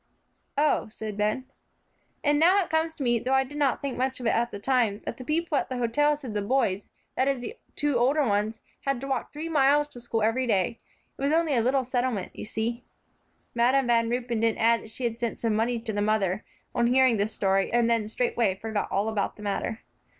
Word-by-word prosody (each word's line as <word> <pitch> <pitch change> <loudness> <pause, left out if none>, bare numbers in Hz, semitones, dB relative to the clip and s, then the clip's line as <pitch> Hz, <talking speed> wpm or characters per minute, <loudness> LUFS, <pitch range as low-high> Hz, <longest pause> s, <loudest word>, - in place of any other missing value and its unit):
"Oh," 295 0 +2
said 215 -1 -6
Ben. 210 +5 0 0.8
"And 290 0 +3
now 355 +5 +6
it - - -10
comes 320 0 +1
to 280 - -4
me, 240 -2 +2
though 260 +4 0
I 265 - +4
didn't 285 0 -1
think 275 -3 -3
much 260 0 -1
of 245 - -6
it - - +3
at 235 +1 +1
the - - -6
time, 225 -2 +1
that 235 - -4
the 255 - -8
people 310 +1 0
at - - -4
the 255 - -3
hotel 295 +5 +2
said 265 -7 -7
the 205 - -1
boys, 205 -3 0 0.3
that 260 - +2
is 275 -2 +1
the 245 - -6 0.2
two 290 -4 +1
older 280 +5 +3
ones, 210 0 0 0.2
had 275 -2 0
to 275 - -5
walk 265 -3 -2
three 305 +2 -5
miles 295 -1 +3
to 245 -4 -11
school 230 -2 -1
every 245 +4 +1
day. 200 +1 +1 0.4
It - - -7
was 280 +1 +1
only 325 -2 +2
a 235 - +3
little 260 +3 +2
settlement, 245 -6 -2
you - - -6
see." 235 +2 -3 0.7
Madam 250 +3 +3
Van 230 -1 +2
Ruypen 240 -1 -1
didn't 225 0 +1
add 230 0 +3
that - - -12
she 250 - -7
had 235 -1 -1
sent 235 -2 -3
some 230 -2 0
money 230 +3 +1
to 225 -1 -4
the 205 - -1
mother, 205 -2 +1 0.3
on 235 - +2
hearing 255 -1 +4
this 205 +2 0
story, 195 -1 +1
and 235 -1 +3
then 230 -2 +1
straightway 225 -3 0
forgot 220 +1 -3
all 200 +3 +1
about 215 -3 -1
the 210 - -11
matter. 210 +2 -2
240 Hz, 230 wpm, -27 LUFS, 220-270 Hz, 0.8 s, now